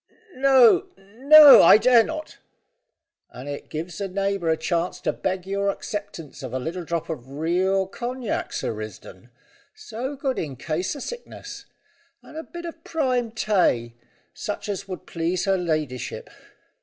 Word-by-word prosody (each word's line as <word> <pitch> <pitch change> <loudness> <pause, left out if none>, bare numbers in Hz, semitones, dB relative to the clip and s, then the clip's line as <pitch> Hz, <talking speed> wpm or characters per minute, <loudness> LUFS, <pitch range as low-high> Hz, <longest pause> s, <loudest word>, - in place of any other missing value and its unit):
"No 260 -3 +5
no, 270 +10 +8
I - - +8
dare 235 +1 +5
not." 310 +2 -7 0.9
"And 130 +3 -10
it 145 0 -7
gives 160 +3 -6
a 200 - -1
neighbour 195 -2 -2
a 160 - +2
chance 170 +2 -2
to - - -1
beg 185 -1 -3
your 200 +1 -1
acceptance 200 - -6
of - - -7
a - - -1
little 170 +6 -5
drop 170 -1 -3
o' - - -2
real 170 +8 -1
cognac, 240 +4 -4
Sir - - -3
Risdon 110 0 -10 0.5
so 285 - -6
good 270 -1 -2
in 145 -5 -5
case 160 - -3
o' - - -7
sickness. 485 - -9 0.6
And - - -15
a 320 - -4
bit 345 +1 -10
of 330 -1 -9
prime 255 -7 -1
tay, 185 - 0 0.4
such - - -5
as 200 -1 -4
would 185 -2 -7
please 170 +2 -2
her 195 -1 +2
ladyship. 155 -8 -3
195 Hz, 155 wpm, -23 LUFS, 160-250 Hz, 0.9 s, no